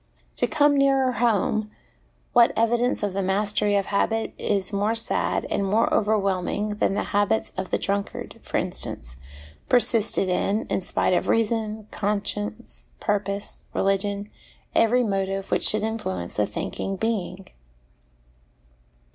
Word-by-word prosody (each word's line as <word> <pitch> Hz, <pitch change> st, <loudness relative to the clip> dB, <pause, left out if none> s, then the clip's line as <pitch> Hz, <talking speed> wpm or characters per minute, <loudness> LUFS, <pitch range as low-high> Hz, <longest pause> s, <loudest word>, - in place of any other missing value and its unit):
To -, -, +3 dB
come 290 Hz, -2 st, +3 dB
nearer 270 Hz, -2 st, +3 dB
home, 215 Hz, -2 st, +1 dB, 0.6 s
what 240 Hz, -1 st, +5 dB
evidence 235 Hz, +2 st, +1 dB
of 205 Hz, -2 st, -1 dB
the 195 Hz, -, -1 dB
mastery 205 Hz, +2 st, +1 dB
of 200 Hz, -1 st, +1 dB
habit 225 Hz, +2 st, 0 dB
is 200 Hz, 0 st, 0 dB
more 205 Hz, +3 st, +1 dB
sad 225 Hz, -, +1 dB
and 200 Hz, -, 0 dB
more 210 Hz, +4 st, +1 dB
overwhelming 205 Hz, -1 st, 0 dB
than 195 Hz, -, +1 dB
the -, -, 0 dB
habits 205 Hz, +2 st, +1 dB
of 185 Hz, 0 st, -4 dB
the -, -, +1 dB
drunkard, 200 Hz, 0 st, -3 dB
for -, -, -3 dB
instance, -, -, -2 dB, 0.5 s
persisted 230 Hz, -5 st, +4 dB
in, 195 Hz, +4 st, 0 dB
in -, -, 0 dB
spite 185 Hz, -, +1 dB
of -, -, +1 dB
reason, 220 Hz, -1 st, 0 dB
conscience, 210 Hz, +2 st, -2 dB
purpose, 200 Hz, -1 st, -1 dB
religion, 200 Hz, +1 st, 0 dB, 0.4 s
every 245 Hz, +2 st, +3 dB
motive 195 Hz, -2 st, -2 dB
which -, -, +3 dB
should 215 Hz, 0 st, +4 dB
influence 105 Hz, -, -3 dB
a 105 Hz, -, +2 dB
thinking 195 Hz, -, -4 dB
being? 195 Hz, -3 st, -3 dB
205 Hz, 130 wpm, -24 LUFS, 195-225 Hz, 0.6 s, what